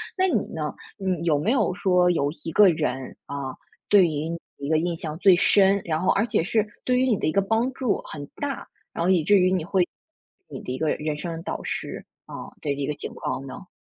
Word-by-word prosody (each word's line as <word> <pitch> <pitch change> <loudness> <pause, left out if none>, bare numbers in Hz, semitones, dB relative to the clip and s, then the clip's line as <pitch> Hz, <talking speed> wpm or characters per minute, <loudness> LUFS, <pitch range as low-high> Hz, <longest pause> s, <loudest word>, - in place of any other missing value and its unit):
那 375 0 +2
你 - - +1
呢， - - -3 0.2
你 185 -4 -1
有 150 -4 +3
没 205 +10 +1
有 215 -9 +2
说 180 -1 +3
有 145 -4 +1
一 165 - -3
个 205 +3 +7
人， 130 -5 -2
啊， 140 -2 -5 0.3
对 200 -3 +7
于 155 -1 -2 0.3
你 140 0 -4
的 160 - +4
印 170 +1 -1
象 155 -1 -5
最 190 -1 +7
深， 195 +2 +4
然 155 -2 0
后 185 +2 +2
而 205 - +2
且 235 - +1
是 215 +4 +1 0.2
对 250 0 +2
于 260 - +3
你 225 -5 +3
的 - - -1
一 - - +2
个 200 - +3
帮 225 +6 +1
助 255 -5 -1
很 145 -2 -7
大， 285 -2 -4 0.3
然 170 - -2
后 175 - +2
以 180 -4 +4
至 205 +6 +5
于 185 0 +3
你 185 -3 +1
会 185 -1 +2 0.6
你 - - -7
的 - - -6
一 130 - -3
个 155 +2 0
人 150 0 -2
生 165 0 -5
导 - - -4
师， - - -4 0.2
嗯， - - -8
的 145 - -1
一 140 0 -2
个 150 - -1
情 - - -7
况 135 - -4
呢？ 185 +8 -9
180 Hz, 250 characters per minute, -25 LUFS, 155-200 Hz, 0.6 s, 个